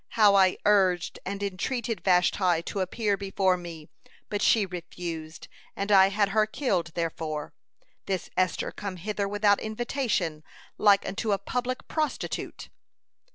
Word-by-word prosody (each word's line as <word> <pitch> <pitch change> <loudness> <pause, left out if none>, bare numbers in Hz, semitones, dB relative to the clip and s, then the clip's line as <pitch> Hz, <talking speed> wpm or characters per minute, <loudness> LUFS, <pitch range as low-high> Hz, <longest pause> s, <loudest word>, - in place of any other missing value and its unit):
How 210 -2 +7
I 190 -2 +4
urged 190 -4 +2
and 200 +1 -4
entreated 225 +4 -2
Vashti 180 -2 +3
to 195 - -4
appear 200 +2 0
before 195 -1 +1
me, 170 -3 -9 0.4
but 205 - -1
she 220 -3 +4
refused, 170 -3 -7 0.3
and 200 +1 -2
I 195 -1 +7
had 200 0 +1
her 215 +1 +2
killed 190 - -1
therefor. 160 -3 -3 0.5
This 190 -3 -2
Esther 185 -2 0
come 200 -2 -6
hither 200 +3 -3
without 205 0 +3
invitation, 220 - -2 0.4
like 200 -2 +4
unto 205 +2 -1
a - - +2
public 250 +5 -3
prostitute." 305 -3 -3
195 Hz, 135 wpm, -27 LUFS, 180-210 Hz, 0.5 s, How